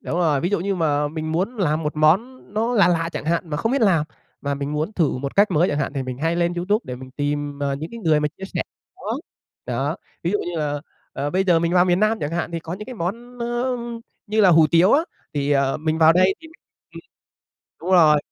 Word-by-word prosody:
Đúng 170 - -3
rồi, 155 -5 +2
ví 175 - -1
dụ 205 - +1
như 195 +1 -1
mà 150 -4 +1
mình 155 0 -4
muốn 195 +9 -1
làm 160 -5 0
1 150 0 -3
món 195 +13 +2
nó 230 +3 0
lạ 205 - +5
lạ 165 -1 +1
chẳng - - -5
hạn 165 0 -1
mà 150 - -1
không 225 - -1
biết 275 - +1
làm 170 -7 +3 0.4
mà 140 0 -2
mình 140 +1 -4
muốn 155 +7 -2
thử 160 -10 0
1 140 +5 -5
cách 205 +1 +5
mới 175 +1 +3
chẳng 145 - -1
hạn 140 - -1
thì 140 -2 -2
mình 130 0 -6
hay 165 +3 0
lên 175 0 +1
YouTube 205 +6 0
để 125 - -5
mình 130 0 -11
tìm, 145 +1 -3
ờ, 140 -1 -1
những 155 +4 -6
cái 235 - -8
người 155 -6 +3
mà 150 - +1
chia 195 - -6
sẻ - - 0 0.3
món - - -15 0.6
đó. - - -3
Đó, - - -1 0.3
ví 170 - 0
dụ 205 - +1
như 175 -4 -4
là, 145 -1 -2 0.3
ờ, 140 +2 -3
bây 190 +3 +1
giờ 175 -3 +4
mình 170 +1 0
vào 180 0 +5
miền 180 +1 +2
Nam 215 +1 +2
chẳng 145 - -2
hạn, 170 +1 -2
thì 165 - -3
có 165 +1 -7
những 210 +2 -8
cái 255 - -7
món, 235 +7 -5
ơ, 240 +2 -1 0.5
như 215 +1 +1
là 195 -3 +6
hủ 160 -2 +6
tiếu 175 +4 +5
á 310 +4 +4 0.3
thì, 145 0 -1
ờ, 135 -1 +2
mình 155 +1 -1
vào 160 0 +7
đây 185 +2 +4
thì 325 - -12 0.5
ừm. - - -8 0.8
Đúng 180 - -4
rồi. 155 -4 +6
165 Hz, 260 wpm, -22 LUFS, 150-195 Hz, 0.8 s, vào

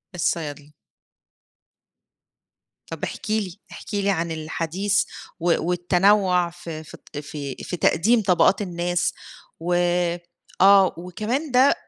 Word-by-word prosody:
الصيادلة. 150 -4 -2 2.2
طَب - - -7
احكِ - - -5
لي، 200 -3 -2
احكِ - - -10
لي 200 0 +1
عن 170 -3 0
الحديث 165 +5 -1 0.4
و 170 0 +3
والتنوّع 180 0 +3
ف 175 0 -11
في 155 -1 -8 0.2
ط - - -6
في 145 -2 -6
في 180 - -4
تقديم 220 +10 +3
طَبَقات 190 +1 +3
الناس، 175 -2 -1 0.5
و 175 +2 -1 0.9
آه 195 -1 +7
وكمان 215 - -3
ده 260 +3 +5
180 Hz, 110 wpm, -23 LUFS, 165-200 Hz, 2.2 s, آه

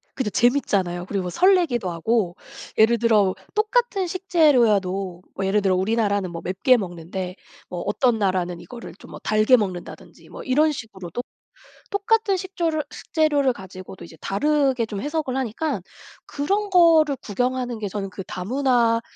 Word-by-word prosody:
그죠. 260 -6 -1
재밌잖아요. 195 -7 +1
그리고 190 -3 -2
설레기도 335 - +2
하고 175 +1 0 0.4
예를 225 +2 +5
들어 210 -5 +3 0.2
똑같은 430 -2 +1
식재료여도 230 - +2
뭐 195 - -2
예를 205 +2 +2
들어 190 -1 +2
우리나라는 200 -1 0
뭐 170 - -6
맵게 240 +8 +3
먹는데 180 -1 -5 0.3
뭐 175 -1 -5
어떤 225 +3 +1
나라는 185 -3 0
이거를 240 -2 -10
좀 - - -14
뭐 - - -9
달게 215 +4 +4
먹는다든지 185 -5 -6
뭐 - - -9
이런 300 +4 +3
식으로 195 -9 -8
또 245 - -3 0.7
똑같은 420 0 +1
식조료 340 -5 -2
식재료를 295 -4 +1
가지고도 190 -2 -11
이제 165 - -14
다르게 270 +2 +1
좀 210 -2 -6
해석을 295 -2 -2
하니까 265 - -2 0.5
그런 400 +9 -1
거를 330 -6 +5
구경하는 245 +2 -2
게 210 - -3
저는 195 0 -4
그 195 - -7
다문화의 230 +4 +1
230 Hz, 350 characters per minute, -23 LUFS, 190-295 Hz, 0.7 s, 예를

